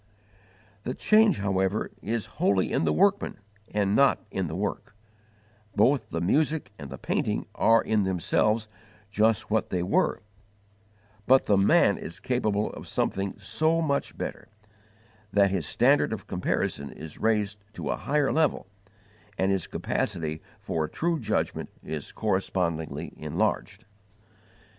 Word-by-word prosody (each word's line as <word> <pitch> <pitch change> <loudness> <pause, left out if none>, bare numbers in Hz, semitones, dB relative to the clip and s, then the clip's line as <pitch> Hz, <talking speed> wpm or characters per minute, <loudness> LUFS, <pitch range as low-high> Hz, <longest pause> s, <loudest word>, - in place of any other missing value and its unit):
The 125 +5 -4
change, 215 -5 +4
however, 95 +1 0
is 110 -1 -2 0.2
wholly 95 -2 +2
in - - +1
the 75 - +2
workman 200 - +2 0.3
and 100 -1 +1
not 140 -1 +3
in 95 -2 -1
the 80 - -5
work: 100 +1 -4 0.8
both 130 +7 +3
the 85 - -2
music 150 - +1
and 70 -2 -7
the - - -7
painting - - -1
are 115 0 +4
in 110 -1 +1
themselves 100 +4 +1 0.4
just 110 0 +2
what 110 -1 +1
they 90 -2 -1
were, 90 - +1 1.0
but 130 +1 +5
the 105 - +3
man 95 0 +4
is 85 +3 -7
capable 110 -3 0
of - - -9
something 95 0 -1
so 160 +1 +1
much 140 -4 -1
better, 105 - -5 0.8
that 100 -1 +4
his 90 -7 -1
standard 135 +1 +3
of 100 -3 -6
comparison 70 -5 -2
is 75 +2 -9
raised 105 -2 +1
to - - -3
a - - 0
higher 145 -1 +1
level, 155 -3 +1 0.7
and 95 +1 +2
his 95 -3 -1
capacity 80 -2 -2 0.2
for 80 -6 -2
a - - -8
true 170 - -1
judgment 110 -3 -2
is 75 -3 -5
correspondingly 85 -4 -1
enlarged. 105 +5 -2
105 Hz, 140 wpm, -27 LUFS, 95-125 Hz, 1.0 s, but